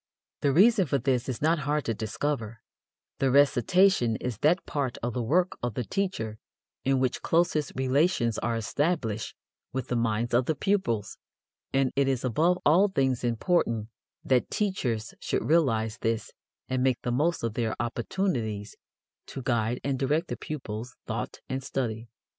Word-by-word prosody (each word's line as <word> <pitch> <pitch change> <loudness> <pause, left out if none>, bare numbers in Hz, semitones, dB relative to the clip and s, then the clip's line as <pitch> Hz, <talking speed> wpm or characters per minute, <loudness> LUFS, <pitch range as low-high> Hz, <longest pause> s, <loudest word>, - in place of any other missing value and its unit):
The 140 - +2
reason 195 - +5
for 140 - +1
this 130 -1 0
is 130 +2 -4
not 165 +1 +3
hard 150 +1 -1
to 115 - 0
discover; 115 +1 -3 0.6
the 135 - +2
recitation 140 - +4
is 120 -2 -4
that 165 +5 +2
part 140 -6 -2
of 120 0 -1
the 125 - -1
work 175 +10 +1
of 120 -3 -2
the 125 - -1
teacher 115 - -2 0.4
in 135 0 +2
which 130 -1 0
closest 165 -3 +1
relations 130 - +1
are 120 -1 -1
established 115 - -1 0.4
with 130 -1 -4
the 125 - 0
minds 115 0 0
of 120 +1 +3
the 160 - +1
pupils, 130 - -1 0.5
and 135 -1 +1
it 140 -1 +2
is 130 -2 0
above 165 +9 +2
all 180 +7 +6
things 135 - 0
important 115 - +1 0.4
that 130 -2 +2
teachers 125 - -1
should - - -2
realize 115 -9 +2
this 115 -1 -1 0.4
and 130 -1 -1
make 130 -2 +2
the 120 - -1
most 150 +6 +1
of 115 -2 -1
their 115 -2 -1
opportunities 120 - -2 0.5
to 135 - -7
guide 120 -1 0
and 135 -1 -1
direct 150 +5 0
the - - -2
pupils' 125 -5 -6
thought - - -4
and 130 0 -3
study. 115 -4 -3
130 Hz, 160 wpm, -28 LUFS, 115-150 Hz, 0.6 s, all